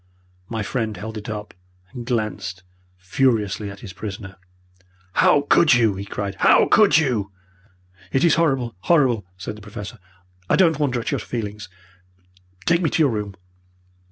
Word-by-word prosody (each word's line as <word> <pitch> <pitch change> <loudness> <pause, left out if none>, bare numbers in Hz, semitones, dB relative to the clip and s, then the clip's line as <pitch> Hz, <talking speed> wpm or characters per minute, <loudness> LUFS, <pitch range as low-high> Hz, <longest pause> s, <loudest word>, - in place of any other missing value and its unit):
My 110 -2 -3
friend 110 -2 -3
held 110 +4 -7
it 105 -1 -7
up 105 -1 -6 0.4
and 120 -2 -8
glanced 110 -6 -3 0.3
furiously 105 0 0
at 100 0 -11
his 100 -5 -9
prisoner. 95 -1 -7 0.8
"How 145 - +4
could 145 0 +4
you!" 115 -4 +3
he 95 +1 -6
cried. 100 -1 -5
"How - - +5
could 210 -5 +5
you!" 120 -11 0 0.8
"It 135 - +1
is 170 - +5
horrible 135 -8 +1
horrible!" 125 - +2
said 95 +2 -6
the 105 - -13
Professor. 105 +2 -9 0.5
"I - - +4
don't 165 -5 +3
wonder 130 -5 0
at 115 - -3
your - - -1
feelings. 105 -4 -5 1.0
Take 170 +1 +3
me 165 - +1
to 160 - +2
your 140 - +3
room." 105 -3 -4
110 Hz, 155 wpm, -22 LUFS, 100-135 Hz, 1.0 s, How